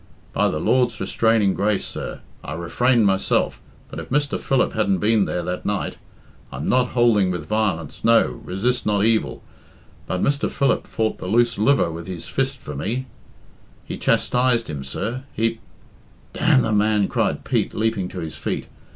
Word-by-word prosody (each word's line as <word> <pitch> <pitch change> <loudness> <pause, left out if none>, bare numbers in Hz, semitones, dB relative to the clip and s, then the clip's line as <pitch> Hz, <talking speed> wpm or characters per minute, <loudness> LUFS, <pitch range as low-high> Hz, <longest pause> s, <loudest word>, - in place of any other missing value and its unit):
"By - - +2
the 75 - -2
Lord's 125 +5 +2
restraining 110 -4 +2
grace, 100 0 0
sir, - - -6 0.2
I 75 - -5
refrained 115 +8 +2
myself 95 -1 +1 0.3
but - - -8
if - - -8
Mr. 145 +1 0
Philip 135 -2 +1
hadn't 100 -3 +1
been 105 0 +3
there 90 - -2
that 90 +1 -4
night 105 -1 -2 0.5
I'm 70 +4 -5
not 125 0 +2
hould 120 -3 +4
ing 95 - +2
with 90 -4 -3
violence, 95 -6 -1
no, 115 0 +5 0.2
resist 120 +7 -1
not 105 -1 +2
evil 115 -1 0 0.6
but 90 - -1
Mr. 140 0 +1
Philip 140 -1 0
fought 110 -1 -1
the - - -6
loose 115 +2 +2
liver 120 -5 +3
with 80 0 -7
his 90 -3 -6
fist 135 0 -1
for 75 - -8
me; 115 - -2 0.8
he - - -5
chastised 125 -4 +1
him, 70 -2 -5
sir; 115 - -4
he 115 +1 0 0.4
" - - -30
"D - - -8
the 135 -7 +3
man!" 105 -1 +3
cried - - -1
Pete, - - 0
leaping 110 -4 0
to 90 -1 -6
his 80 -1 -5
feet. - - -3
110 Hz, 175 wpm, -22 LUFS, 95-120 Hz, 0.8 s, no